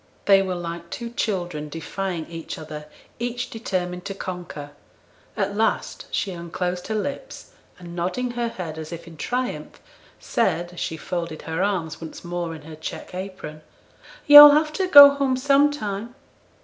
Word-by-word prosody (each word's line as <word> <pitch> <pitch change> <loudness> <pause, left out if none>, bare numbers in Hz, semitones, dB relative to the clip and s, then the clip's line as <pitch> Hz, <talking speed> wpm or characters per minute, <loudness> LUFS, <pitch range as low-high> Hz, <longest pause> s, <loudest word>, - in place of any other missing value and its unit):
They 195 -1 +6
were 185 -1 -2
like 170 -1 -6
two 235 +4 -6
children 175 -10 -3
defying 165 +2 -4
each 165 -1 -7
other; 150 -1 -8 0.3
each 245 +1 -3
determined 180 -5 -3
to 195 -1 -5
conquer. 175 -6 -7 0.7
At 200 - -1
last 220 +2 -1
she 195 - -2
unclosed 180 +1 -4
her 220 - -2
lips, 285 - -5 0.3
and 175 -1 -10
nodding 185 +9 -2
her 240 0 -2
head 170 -8 -6
as 155 +1 -8
if 170 -1 -8
in 165 -1 -12
triumph, 250 - -4 0.4
said, 175 -5 -1
as 175 - -9
she 160 - -3
folded 170 -1 -5
her 160 +2 -3
arms 185 -6 -2
once 160 - -9
more 175 -1 -4
in 155 - -12
her 155 +1 -10
check 155 - -8
apron, 185 -5 -7 0.6
'Yo'll 295 0 +12
have 305 +1 +2
to 370 +3 -1
go 285 -4 +11
home 275 -2 0
sometime.' 260 -5 +1
180 Hz, 160 wpm, -23 LUFS, 170-235 Hz, 0.7 s, Yo'll